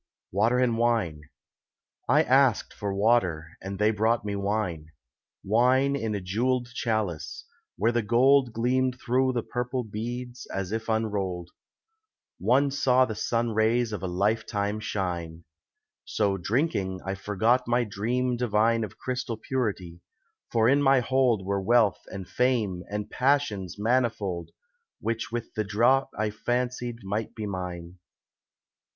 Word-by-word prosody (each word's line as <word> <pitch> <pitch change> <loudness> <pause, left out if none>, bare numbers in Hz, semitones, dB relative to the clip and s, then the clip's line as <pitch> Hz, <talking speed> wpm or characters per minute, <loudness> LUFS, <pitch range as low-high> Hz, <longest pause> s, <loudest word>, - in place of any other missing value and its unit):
WATER 110 +6 +2
AND 120 -2 +2
WINE 110 -11 +1 0.9
I - - +5
asked 130 -3 +3
for 100 -2 -4
water 95 -6 +1
and 95 +1 -5
they 105 +2 +3
brought 110 +1 +1
me 100 -1 -2
wine; 100 -6 -2 0.6
Wine 130 +6 +3
in 110 -6 -2
a - - -1
jewelled 120 +6 -1
chalice, 110 - -2 0.3
where 115 - +2
the 120 0 +1
gold 125 +4 +4
Gleamed 125 +2 0
thro' 130 +3 +1
the 120 -3 -2
purple 125 +1 -3
beads, 120 +3 -6
as 95 -1 -3
if 115 +1 -3
unrolled 100 -6 -1 0.9
One 140 +2 +3
saw 130 -2 +3
the 110 - -4
sun 115 +2 -1
rays 110 +1 +1
of 105 - -4
a 95 - -2
life 100 +5 +1
time 105 0 -1
shine. 85 -5 -4 0.6
So 100 -2 0
drinking, 95 - -1
I 95 - -2
forgot 105 +6 +1
my 120 +1 +2
dream 120 +4 -1
divine 115 -1 +2
Of 105 - -7
crystal 125 -3 -3
purity, 100 -9 -3 0.5
for 115 -1 +3
in 140 +3 +4
my 135 -2 +5
hold 125 -5 +2
Were 100 0 -1
wealth 110 0 +3
and 95 -2 -7
Fame 115 -8 0
and 105 0 -3
Passions 125 -10 0
manifold 105 -6 0 0.5
Which 115 0 -3
with 120 -1 -4
the 110 - -1
draught 120 +7 +2
I 105 0 0
fancied 120 +1 -2
might 105 +3 -3
be 110 - -4
mine. 90 -2 -6
110 Hz, 140 wpm, -27 LUFS, 100-125 Hz, 0.9 s, I